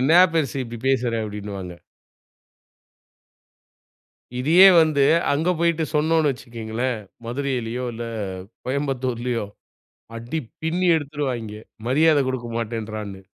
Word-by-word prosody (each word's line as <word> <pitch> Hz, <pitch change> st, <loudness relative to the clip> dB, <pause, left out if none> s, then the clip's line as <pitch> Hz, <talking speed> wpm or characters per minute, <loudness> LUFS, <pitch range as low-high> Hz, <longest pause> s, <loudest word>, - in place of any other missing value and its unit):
என்னா 160 Hz, +7 st, +6 dB
பெருசு 140 Hz, -5 st, 0 dB
இப்படி 115 Hz, -1 st, -8 dB
பேசுறா" 120 Hz, -3 st, +1 dB
அப்படின்னுவாங்க. 100 Hz, -4 st, -6 dB, 2.7 s
இதையே 170 Hz, +9 st, +7 dB
வந்து 150 Hz, -3 st, +3 dB, 0.3 s
அங்க 160 Hz, +5 st, +1 dB
போயிட்டு 170 Hz, -1 st, +2 dB
சொன்னோனு 155 Hz, 0 st, +3 dB
வச்சிக்கேங்களேன். 120 Hz, 0 st, -4 dB, 0.3 s
மதுரையிலியோ, 125 Hz, -1 st, -2 dB
இல்ல 120 Hz, +1 st, -5 dB, 0.6 s
கோயம்புத்தூர்லியோ 125 Hz, -4 st, -2 dB, 0.7 s
அடி 120 Hz, +7 st, -4 dB, 0.2 s
பின்னி 175 Hz, +3 st, 0 dB
எடுத்துருவாய்ங்க. 135 Hz, -7 st, -3 dB, 0.3 s
மரியாத 155 Hz, +3 st, +4 dB
கொடுக்கமாட்டேன்றான்னு. 115 Hz, -5 st, -4 dB
125 Hz, 85 wpm, -23 LUFS, 115-150 Hz, 2.7 s, இதையே